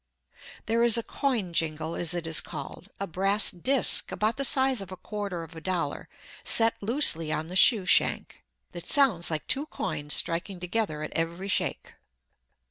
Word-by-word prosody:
There 230 +1 0
is 235 -1 +3
a 230 - -2
"coin 225 -12 -2
jingle," 160 0 -1
as 175 0 -2
it 170 -1 -4
is 160 -3 +2
called, 195 - -9
a 200 - -3
brass 195 +4 +2
disc 255 +9 +3
about 215 +2 -2
the 275 - -1
size 265 -3 +3
of 190 -1 -9
a 185 - -8
quarter 200 -5 -6
of 165 +1 -13
a 160 - -10
dollar 170 -5 -4 0.3
set 225 0 +3
loosely 200 - +2
on 160 +1 -4
the 180 - -8
shoe 205 0 +5
shank, - - +1 0.3
that - - -7
sounds 255 - +3
like 155 -2 -4
two 285 +3 -1
coins 150 - -1
striking 175 +3 0
together 180 -4 -3
at - - -7
every 170 +4 -4
shake. - - -3
185 Hz, 175 wpm, -26 LUFS, 165-225 Hz, 0.3 s, shoe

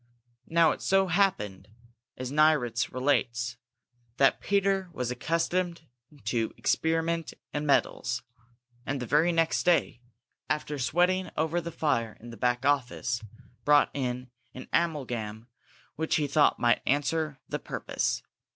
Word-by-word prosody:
Now 165 -1 +4
it - - -5
so 195 -1 +3
happened, 165 - +1 0.5
as 130 0 -5
Nieritz 140 -6 +3
relates, 120 -2 0 0.6
that 135 - +4
Peter 195 -2 +1
was 125 -3 -2
accustomed 170 +5 -1 0.4
to 110 +1 -1
experiment 165 0 0 0.2
in 150 0 -2
metals, 125 -3 +1 0.6
and 135 +1 -2
the 125 - -3
very 150 +7 +3
next 165 -1 +2
day, 170 -8 +2 0.5
after 150 -1 -2
sweating 180 +8 +2
over 160 +3 +1
the 170 0 -6
fire 115 -9 -1
in 120 +1 -10
the - - -9
back 125 +3 0
office, 125 -4 0 0.4
brought 145 0 +5
in 125 -2 -3 0.2
an 130 - -8
amalgam 120 -9 -1 0.5
which 160 +1 0
he 150 - +2
thought 145 +1 +3
might 120 0 +3
answer 145 +1 0
the - - -3
purpose. - - -2
145 Hz, 130 wpm, -28 LUFS, 125-165 Hz, 0.6 s, brought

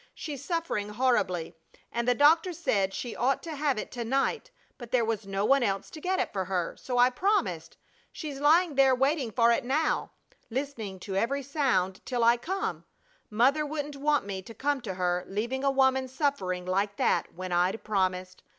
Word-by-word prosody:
She's 285 -3 -6
suffering 325 - -2
horribly, 210 -8 0 0.4
and 235 +1 -2
the 245 - +4
doctor 320 +6 +4
said 200 - 0
she 240 +3 -5
ought 265 +3 0
to 325 -2 -5
have 285 -3 0
it - - -5
to 240 -2 -4
night, 275 - 0 0.3
but 240 -3 -9
there 245 -2 +2
was 220 -2 -2
no 195 +1 -1
one 275 +4 +4
else 195 -4 -1
to 310 - -9
get 375 +3 0
it - - -2
for 190 -2 -1
her, 180 -2 -2
so 250 -1 -4
I 245 +1 +5
promised. 400 +11 -1 0.3
She's 290 -4 -6
lying 320 +3 +4
there 270 -1 +5
waiting 270 -1 +1
for 235 +2 +4
it 235 - +1
now, 295 +6 0 0.4
listening 235 -7 -4
to 195 0 -5
every 275 +8 0
sound 245 - 0
till 245 -2 -1
I 235 +1 +6
come. 380 +10 -3 0.5
Mother 260 +8 +3
wouldn't 295 -1 -4
want 290 -3 +1
me 195 -2 -4
to 225 +4 -12
come 285 -1 -1
to 195 -6 -5
her, 180 -1 0
leaving 235 +7 -3
a 275 - +3
woman 265 -1 +2
suffering 255 - -1
like 200 +2 0
that - - +1
when 185 +1 -6
I'd 180 +5 +1
promised. 185 -3 -1
250 Hz, 190 wpm, -28 LUFS, 200-285 Hz, 0.5 s, I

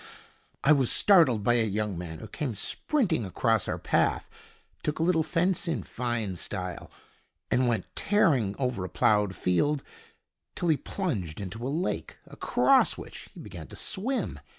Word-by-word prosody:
I 145 - +5
was 135 -5 +4
startled 155 - +5
by 120 - +4
a 115 - +3
young 105 -1 -1
man 85 -2 -6
who - - -9
came 135 -7 -4
sprinting 185 - 0
across 95 -4 0
our - - -2
path, - - +1 0.5
took 150 - -2
a 160 - 0
little 165 -1 +3
fence 170 +4 0
in 165 - -1
fine 115 -6 -3
style, 90 -1 -5 0.6
and 125 0 +3
went 115 -5 0
tearing 135 - +2
over 125 -7 -1
a 90 - -5
ploughed 105 +2 +2
field 135 - +1 0.7
till 175 - -1
he 155 - +4
plunged 105 - -3
into 105 +5 -5
a - - -2
lake, 165 +6 -3
across 270 -1 +2
which - - -10
he - - -10
began - - -9
to - - -12
swim. 245 +7 -2
125 Hz, 160 wpm, -28 LUFS, 100-165 Hz, 0.7 s, I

